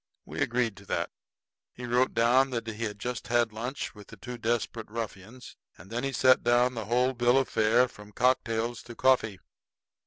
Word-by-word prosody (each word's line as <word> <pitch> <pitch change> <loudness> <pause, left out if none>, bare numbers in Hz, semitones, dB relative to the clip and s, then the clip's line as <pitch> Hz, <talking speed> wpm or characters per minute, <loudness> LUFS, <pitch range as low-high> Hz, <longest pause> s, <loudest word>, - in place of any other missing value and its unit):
We - - -6
agreed 120 -3 0
to 100 - -14
that. - - -2 0.6
He 125 - -8
wrote 125 +2 +1
down 125 +4 +4
that 115 -3 -3
he 115 0 -4
had 105 -1 -5
just 120 +4 -5
had 120 -2 +2
lunch 125 +5 -4
with 105 -2 -14
the - - -13
two 125 -1 -8
desperate 115 -1 -2
ruffians; 115 +1 -7 0.2
and 95 +6 -15
then 120 +2 -2
he 135 - -1
set 130 +1 +4
down 120 +1 +3
the 115 -3 -5
whole 125 +4 +2
bill 120 +1 +3
of 135 - +2
fare, 115 +4 +3
from 105 -3 -14
cocktails 120 -1 0
to 120 - -10
coffee. 125 -6 +2
120 Hz, 190 wpm, -28 LUFS, 110-125 Hz, 0.6 s, down